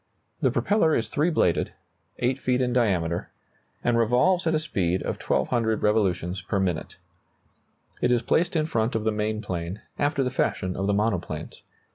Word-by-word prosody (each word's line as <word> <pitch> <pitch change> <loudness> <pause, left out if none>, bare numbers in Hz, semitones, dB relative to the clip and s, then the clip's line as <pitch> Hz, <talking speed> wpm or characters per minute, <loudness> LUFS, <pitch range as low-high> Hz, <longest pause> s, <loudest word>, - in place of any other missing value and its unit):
The - - +4
propeller 185 -7 +2
is 115 -2 -1
three 150 +8 +1
bladed, 90 - +1 0.4
8 125 +2 0
feet 125 -1 +1
in 125 -1 +1
diameter, 90 -8 +1 0.5
and 120 -1 +2
revolves 130 +11 +3
at 160 - +2
a - - +2
speed 95 - -1
of - - -4
1,200 110 -3 0
revolutions 95 -4 +1
per 95 +2 -1
minute. 90 -4 -2 1.0
It 125 - +3
is 120 -1 +2
placed 175 +2 +1
in 155 -1 +2
front 115 -7 0
of 110 - 0
the 110 - +1
main 105 +1 -2
plane, 90 0 -4 0.2
after 145 -1 +1
the 125 - -1
fashion 95 -7 -1
of 95 +1 -1
the 100 - +2
monoplanes. 100 -7 -2
110 Hz, 170 wpm, -25 LUFS, 95-130 Hz, 1.0 s, The